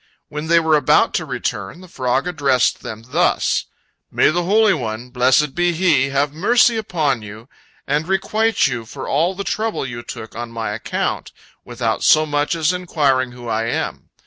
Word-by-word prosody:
When 150 Hz, +1 st, -5 dB
they 170 Hz, +1 st, +5 dB
were 160 Hz, -1 st, +3 dB
about 145 Hz, -3 st, +3 dB
to -, -, -1 dB
return, 175 Hz, -, -4 dB
the 185 Hz, -, -13 dB
frog 130 Hz, -4 st, -1 dB
addressed 140 Hz, -7 st, +1 dB
them 110 Hz, 0 st, -8 dB
thus: -, -, +1 dB, 0.4 s
"May -, -, +3 dB
the 175 Hz, +3 st, 0 dB
Holy 210 Hz, +2 st, +4 dB
One, 120 Hz, -3 st, -5 dB
blessed 130 Hz, +3 st, +2 dB
be 175 Hz, 0 st, +1 dB
He, 160 Hz, -6 st, +2 dB
have 140 Hz, +1 st, 0 dB
mercy 235 Hz, +8 st, +3 dB
upon 155 Hz, -, -1 dB
you, 105 Hz, +3 st, -11 dB, 0.4 s
and 150 Hz, +3 st, -1 dB
requite 215 Hz, +4 st, +1 dB
you 125 Hz, -5 st, -2 dB
for -, -, -7 dB
all 170 Hz, +6 st, +1 dB
the 200 Hz, -, -4 dB
trouble 215 Hz, -5 st, -2 dB
you 120 Hz, -2 st, -6 dB
took 110 Hz, -2 st, -9 dB
on 120 Hz, 0 st, -5 dB
my 115 Hz, -2 st, -4 dB
account, 105 Hz, +1 st, -3 dB, 0.3 s
without 120 Hz, -2 st, -2 dB
so 155 Hz, 0 st, +5 dB
much 145 Hz, +2 st, 0 dB
as 165 Hz, +1 st, +1 dB
inquiring 140 Hz, -8 st, 0 dB
who 120 Hz, -1 st, -10 dB
I 115 Hz, 0 st, -1 dB
am. 115 Hz, -, -3 dB
145 Hz, 175 wpm, -19 LUFS, 120-175 Hz, 0.4 s, they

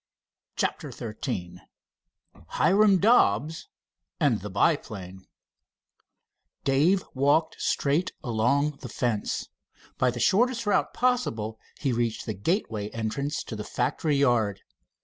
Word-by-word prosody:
CHAPTER -, -, -2 dB
XIII 95 Hz, -6 st, -5 dB, 0.9 s
HIRAM 200 Hz, -, +4 dB
DOBBS 160 Hz, -, +3 dB, 0.5 s
AND -, -, +2 dB
THE -, -, -6 dB
BIPLANE 95 Hz, -2 st, -1 dB, 1.4 s
Dave 155 Hz, +8 st, +3 dB
walked 145 Hz, +4 st, +2 dB
straight 155 Hz, +6 st, +1 dB
along 140 Hz, +6 st, +1 dB
the 125 Hz, -, -7 dB
fence. 110 Hz, -2 st, -2 dB, 0.5 s
By 130 Hz, -, +3 dB
the 120 Hz, 0 st, -4 dB
shortest 235 Hz, -, +2 dB
route 205 Hz, -, +2 dB
possible 115 Hz, -, 0 dB, 0.2 s
he 135 Hz, -4 st, 0 dB
reached 115 Hz, -1 st, -1 dB
the 110 Hz, -, -3 dB
gateway 105 Hz, -, -1 dB
entrance 140 Hz, +7 st, -3 dB
to 110 Hz, -, -7 dB
the 105 Hz, -, -5 dB
factory 150 Hz, +7 st, -1 dB
yard. 120 Hz, -8 st, +2 dB
130 Hz, 110 wpm, -27 LUFS, 110-165 Hz, 1.4 s, HIRAM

